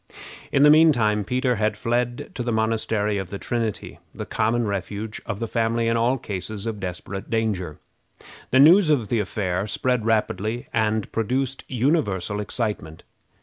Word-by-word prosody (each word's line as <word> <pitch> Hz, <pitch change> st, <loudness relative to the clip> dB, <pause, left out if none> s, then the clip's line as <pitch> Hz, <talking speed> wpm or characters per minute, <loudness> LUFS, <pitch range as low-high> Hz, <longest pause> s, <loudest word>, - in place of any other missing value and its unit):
In 140 Hz, -, +4 dB
the 150 Hz, -, +8 dB
mean 160 Hz, +1 st, +7 dB
time 105 Hz, -5 st, +1 dB
Peter 125 Hz, +2 st, 0 dB
had 105 Hz, 0 st, 0 dB
fled 120 Hz, +1 st, -2 dB
to -, -, -5 dB
the 120 Hz, 0 st, -1 dB
Monastery 110 Hz, -2 st, 0 dB
of 95 Hz, -2 st, -5 dB
the 100 Hz, -, -5 dB
Trinity, 115 Hz, -1 st, -3 dB, 0.2 s
the -, -, -5 dB
common 115 Hz, +2 st, 0 dB
refuge 105 Hz, +2 st, -4 dB
of 100 Hz, -, -3 dB
the 115 Hz, -, -2 dB
family 115 Hz, 0 st, 0 dB
in 115 Hz, -, +2 dB
all 120 Hz, +3 st, +2 dB
cases 100 Hz, -1 st, -5 dB
of 110 Hz, -2 st, -3 dB
desperate 95 Hz, +1 st, -6 dB
danger. 105 Hz, -9 st, -1 dB, 0.7 s
The 130 Hz, -, +4 dB
news 165 Hz, +5 st, +7 dB
of 125 Hz, -9 st, +2 dB
the 115 Hz, -, +1 dB
affair 100 Hz, -2 st, -2 dB
spread 125 Hz, +1 st, 0 dB
rapidly, 110 Hz, +1 st, 0 dB
and 110 Hz, -1 st, 0 dB
produced 130 Hz, +4 st, -1 dB
universal 115 Hz, -, 0 dB
excitement. 105 Hz, -7 st, -3 dB
110 Hz, 160 wpm, -23 LUFS, 105-120 Hz, 0.7 s, the